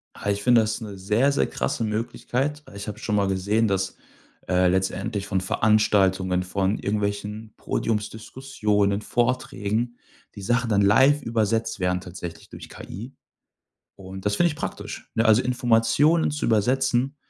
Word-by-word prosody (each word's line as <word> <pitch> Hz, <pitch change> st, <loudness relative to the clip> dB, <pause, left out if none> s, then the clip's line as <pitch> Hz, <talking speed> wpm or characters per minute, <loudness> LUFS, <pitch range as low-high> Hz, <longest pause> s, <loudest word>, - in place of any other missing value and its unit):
Ah, 100 Hz, -, -4 dB
ich 100 Hz, 0 st, -1 dB
finde 120 Hz, -2 st, +5 dB
das 110 Hz, +2 st, -2 dB
'ne 105 Hz, -3 st, -7 dB
sehr, 105 Hz, +9 st, +2 dB
sehr 140 Hz, -, +1 dB
krasse 115 Hz, -, -2 dB
Möglichkeit. 125 Hz, +6 st, -2 dB
Äh, -, -, -14 dB
ich 100 Hz, +1 st, -7 dB
habe 105 Hz, +1 st, -6 dB
schon 105 Hz, -, -1 dB
mal 100 Hz, -1 st, +2 dB
gesehen, 100 Hz, +4 st, +1 dB
dass, 95 Hz, -1 st, -1 dB, 0.5 s
äh, 90 Hz, 0 st, +3 dB
letztendlich 95 Hz, +2 st, -1 dB
von 95 Hz, -2 st, 0 dB
Veranstaltungen, 95 Hz, -2 st, +2 dB
von 95 Hz, +2 st, -1 dB
irgendwelchen 105 Hz, +1 st, -3 dB
Podiumsdiskussionen, 105 Hz, -2 st, -1 dB
Vorträgen, 120 Hz, -1 st, -1 dB, 0.4 s
die 100 Hz, -, -8 dB
Sachen 120 Hz, +4 st, 0 dB
dann 100 Hz, -1 st, +3 dB
live 130 Hz, +9 st, +5 dB
übersetzt 115 Hz, -1 st, -1 dB
werden 90 Hz, 0 st, 0 dB
tatsächlich 90 Hz, -2 st, -9 dB
durch -, -, -10 dB
KI. 115 Hz, +9 st, -9 dB, 0.8 s
Und 95 Hz, 0 st, -9 dB
das 105 Hz, 0 st, +1 dB
finde 175 Hz, -, +4 dB
ich 150 Hz, -, -5 dB
praktisch, -, -, -6 dB
ne? 115 Hz, -, +2 dB
Also 110 Hz, +2 st, +5 dB
Informationen 125 Hz, +7 st, +2 dB
zu 150 Hz, 0 st, -4 dB
übersetzen, 125 Hz, +4 st, +1 dB
105 Hz, 150 wpm, -24 LUFS, 100-120 Hz, 0.8 s, finde